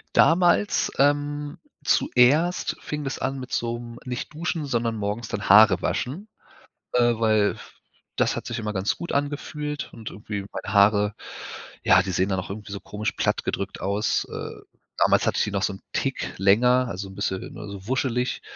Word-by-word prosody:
Damals, 175 +4 +4
ähm, 145 +2 +1 0.3
zuerst 150 +9 +3
fing 150 0 -5
das 135 -1 -4
an 135 +1 -2
mit 130 -1 -8
so 120 0 -1
'nem 120 0 -9
nicht 125 +2 -5
duschen, 165 0 -2
sondern 120 -4 -1
morgens 105 +2 -3
dann 100 -1 -4
Haare 100 -3 +7
waschen, 170 - -3 0.7
äh, 125 - +4
f 120 - 0
f - - -11
weil 110 -2 +3 0.6
das - - +1
hat - - -5
sich - - -3
immer 105 -1 -3
ganz 95 +1 0
gut 170 - -5
angefühlt 145 +1 -3
und 110 -2 -8
irgendwie 105 0 -5
meine 100 - -6
Haare, 105 0 +4 0.7
ja, 95 - +6
die 95 - -4
sehen 95 +3 +1
dann 95 -1 0
auch 90 - -8
irgendwie 105 0 -7
so 100 - -5
komisch 105 +1 -3
platt - - 0
gedrückt 100 0 -3
aus, 100 +2 0
äh. - - -6 0.4
Damals - - +4
hatte - - +1
ich - - +3
die - - -3
noch 100 -1 -1
so 100 - 0
'n - - -12
Tick - - -2
länger, 125 +6 +4
also, 100 -2 -5
'n - - -11
bisschen, 95 -1 -3
ne, 105 -2 -8
so 100 0 -9
wuschelig. 125 -1 0
115 Hz, 190 wpm, -25 LUFS, 100-140 Hz, 0.7 s, Haare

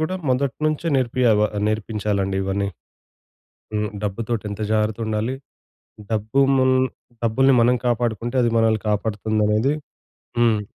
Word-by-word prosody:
గూడా 155 +4 -1 0.2
మొదట్నుంచే 145 +5 0
నేర్పియవ 120 -4 +2 0.2
నేర్పించాలండి 105 -3 -1
ఇవన్నీ. 100 +1 -1 1.1
హ్మ్. 105 0 0
డబ్బుతోటి 110 +2 -2
ఎంత 100 +1 -6
జాగ్రత్త 110 +1 0
ఉండాలి? 110 +4 -1 0.8
డబ్బు 110 +4 0 0.2
మున్ 130 0 +4 0.5
డబ్బుల్ని 130 +4 +3
మనం 125 +2 +4
కాపాడుకుంటే 120 0 -1
అది 120 - +2
మనల్ని 110 -1 +2
కాపాడుతుందనేది 105 +4 +1 0.7
హ్మ్. 115 -3 +4
110 Hz, 105 wpm, -22 LUFS, 105-125 Hz, 1.1 s, మున్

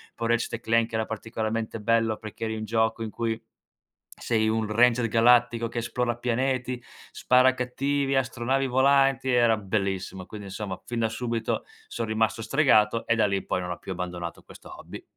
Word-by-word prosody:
poi 115 - -3
Ratchet& 115 0 0
Clank 115 0 +2
era 110 0 0
particolarmente 110 0 -3
bello 115 0 +2
perché 110 +1 -7
eri 110 0 -2
in 110 0 -4
gioco 110 +1 0
in 110 - -5
cui 115 -1 -2 0.7
sei 110 -2 0
un 110 0 0
ranger 115 +2 +3
galattico 115 +1 +4
che - - -8
esplora 120 0 -2
pianeti, 125 0 -1 0.3
spara 130 +1 +4
a - - 0
cattivi, 135 +2 -1
astronavi 130 +1 0
volanti, 135 0 +3
era 120 -2 +4
bellissimo. 95 -2 -3
Quindi, 105 0 -9
insomma, 95 -1 -5
fin 120 -1 -3
da 110 -1 +1
subito 115 0 -2 0.2
son 115 - -4
rimasto 110 0 0
stregato 115 -6 +3
e 115 - +3
da 110 - +3
lì 100 0 0
in - - -6
poi 90 - -1
non 90 - -5
ho - - -4
più - - -8
abbandonato 90 -1 -5
questo - - -13
hobby. - - -10
115 Hz, 180 wpm, -26 LUFS, 110-125 Hz, 0.7 s, galattico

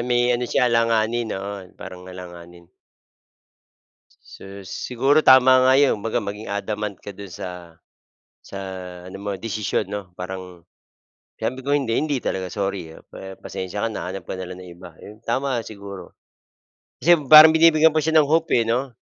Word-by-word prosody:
may 120 0 +1
ano 120 0 -2
siya - - +2
alanganin, 115 -1 +1
oo, 100 -1 -7
parang 90 0 -10
alanganin. 85 -1 -12 1.5
Sus, 100 0 -12
siguro 135 +9 +1
tama 130 -1 +6
nga 130 +1 +5
'yon, 135 -7 +2
baga 115 +2 -1
maging 105 0 -6
adamant 105 0 -4
ka 100 - -10
do'n 100 0 -10
sa 90 - -7 1.0
sa 100 - -9 0.5
ano 95 - -9
mo 100 +1 -6
desisyon 105 -2 -2
'no, 100 -3 -7
parang 90 -1 -8 0.8
sabi 125 +4 -3
ko, 135 - -7
"Hindi, 135 -6 0
hindi 150 -3 0
talaga, 95 -1 -3
sorry 95 -5 -4
ah, - - -15
pa 95 0 -11
pasensiya 95 +4 -5
ka - - -1
na 90 -3 -5
hanap 95 -2 -7
ka - - -5
na 95 -1 -7
lang 90 - -8
ng 90 -1 -11
iba." 90 0 -11
Ayun, 105 +1 -13
tama 130 +1 -1
siguro. 100 -2 -10 0.9
Kasi 175 +2 +5 0.2
parang 155 +1 +10
binibigyan 160 -1 +5
pa 155 - +2
siya 160 +1 +4
ng 150 - +3
hope, 165 +2 +1
eh 115 - -1
'no? 125 +3 -1
105 Hz, 165 wpm, -22 LUFS, 95-130 Hz, 1.5 s, parang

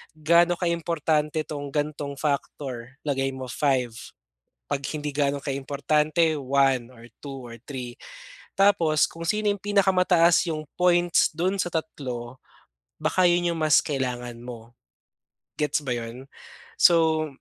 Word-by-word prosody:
Gaano 170 +3 +4
ka 180 - -1
importante 155 -2 0
tong 145 -1 -6
gantong 145 0 -3
factor 135 -3 -4
lagay 135 -2 0
mo 130 0 -6
5. 130 -3 +1 0.8
Pag 135 - 0
hindi 150 -1 -3
gaano 140 -1 -1
ka 140 - -2
importante 150 +4 +1
1 135 -2 +1
or 115 0 -14
2 135 -2 -8
or 115 - -12
3 125 -3 -5 0.6
tapos 170 -6 +4
kung 165 - -6
sino 210 +1 +2
'yong 200 - -7
pinakamataas 185 -4 +3
'yong 155 -1 -3 0.2
points 175 -1 +4
do'n 185 +4 0
sa 175 - 0
3 130 -7 -5 0.6
baka 175 +4 +2
yun 175 0 +2
yung 165 - -5
mas 155 -2 +4
kailangan 125 -5 -3
mo. 120 -1 -10 0.9
Gets 150 0 0
ba 125 -4 -2
'yon? 120 +3 -8 0.5
So, 160 -2 +4
150 Hz, 135 wpm, -25 LUFS, 135-170 Hz, 0.9 s, Gaano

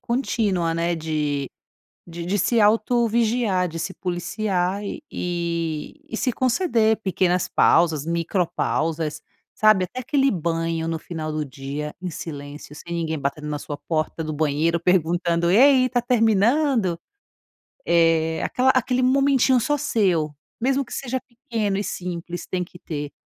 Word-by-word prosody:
contínua, 210 -9 0
né, 170 +1 0
de 150 -4 -2 0.6
de 170 0 -7
de 195 +3 0
se 230 +4 +2
auto-vigiar, 225 -2 +2
de 165 - -7
se 180 +3 -3
policiar 185 +1 -2
e 205 - -5
e 170 -3 -3 0.2
e - - -4
se 255 - 0
conceder 235 - +2
pequenas 185 -2 +1
pausas, 160 -4 +3
micropausas, 165 -2 -1 0.3
sabe, 215 -3 +4
até 250 +8 -8
aquele 270 +2 +2
banho 165 -2 -1
no 165 0 -1
final 155 -1 -5
do 155 0 -2
dia 140 +2 -6
em 185 - -3
silêncio, 145 -2 -8
sem 170 +3 -8
ninguém 160 -2 -2
batendo 140 +2 -3
na 150 -1 -3
sua 145 - -6
porta 155 +1 -2
do 155 - -4
banheiro, 155 +3 +1
perguntando: 170 0 +1
"E 195 - +5
aí, 265 0 +6
está 250 -1 0
terminando?". 225 - +2 0.9
Eh, 165 -1 +3
aquela 260 +1 +2
aquele 255 0 +1
momentinho 265 -1 +4
só 295 +6 +1
seu, 190 - +1 0.3
mesmo 270 +3 +1
que - - -14
seja 260 -1 -3
pequeno 230 -6 -3
e 205 - -2
simples, 175 -1 -5
tem 180 -1 -2
que 175 - -15
ter. 145 -4 -5
175 Hz, 145 wpm, -23 LUFS, 160-230 Hz, 0.9 s, aí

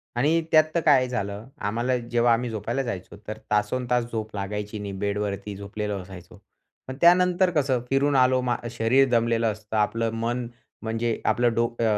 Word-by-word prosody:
आणि 150 +7 +2
त्यात 155 0 +7
तर - - +4
काय 130 -4 +5
झालं, 105 -2 -4
आम्हाला 120 +5 -1
जेव्हा 120 0 +2
आम्ही 120 +1 -1
झोपायला 115 +5 -2
जायचो, 100 -4 -6
तर 110 +1 -5
तासंतास 125 +3 +1
झोप 110 -1 -4
लागायची 105 +1 -4
नाही, 100 -1 -5
बेडवरती 100 0 -3
झोपलेलो 100 +1 -4
असायचो. 90 -1 -12 0.5
पण 130 - -5
त्यानंतर 180 +1 +5
कसं, 135 -4 +1
फिरून 140 +1 +2
आलो, 130 0 +4
मा 125 -1 0 0.2
शरीर 120 +4 +3
दमलेलं 115 -1 +2
असतं, 105 +1 -6
आपलं 115 +2 +1
मन, 120 +2 -2 0.3
म्हणजे 115 0 -2
आपलं 120 -1 +2
डोकं, 115 0 -1
115 Hz, 160 wpm, -25 LUFS, 105-125 Hz, 0.5 s, त्यात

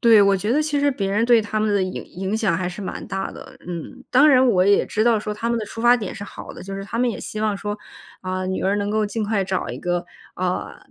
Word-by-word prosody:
对， 230 -3 +7
我 200 -1 +5
觉 210 +4 -1
得 300 +4 +3
其 295 -1 0
实 285 0 +3
别 200 -7 -2
人 210 +3 +2
对 235 -1 +5
他 215 0 -2
们 215 -1 +1
的 200 - +2
影 185 0 -4
影 190 +3 -3
响 210 -7 +1
还 180 -1 -2
是 180 +3 -7
蛮 190 - -5
大 195 0 -3
的。 - - -11
嗯， 180 +9 -7
当 290 +4 +6
然 260 -2 +6
我 190 -7 +4
也 200 +1 +4
知 215 - 0
道 230 -1 +4
说 210 0 -4
他 220 +2 -3
们 235 0 +1
的 220 - -3
出 225 - -7
发 240 +1 +6
点 210 -6 -5
是 220 - -7
好 - - -9
的， - - -10
就 195 +1 -6
是 195 0 -5
他 230 - -4
们 245 0 +2
也 - - -5
希 215 - -5
望 215 -2 +1
说， 205 +1 -4 0.4
啊， 185 0 -3
女 190 0 -2
儿 195 +2 +2
能 205 0 -1
够 215 0 +1
尽 215 +1 -2
快 205 -1 +1
找 190 -1 -2
一 - - -5
个， 175 0 -1 0.3
啊， 180 0 -2
210 Hz, 310 characters per minute, -22 LUFS, 190-230 Hz, 0.4 s, 对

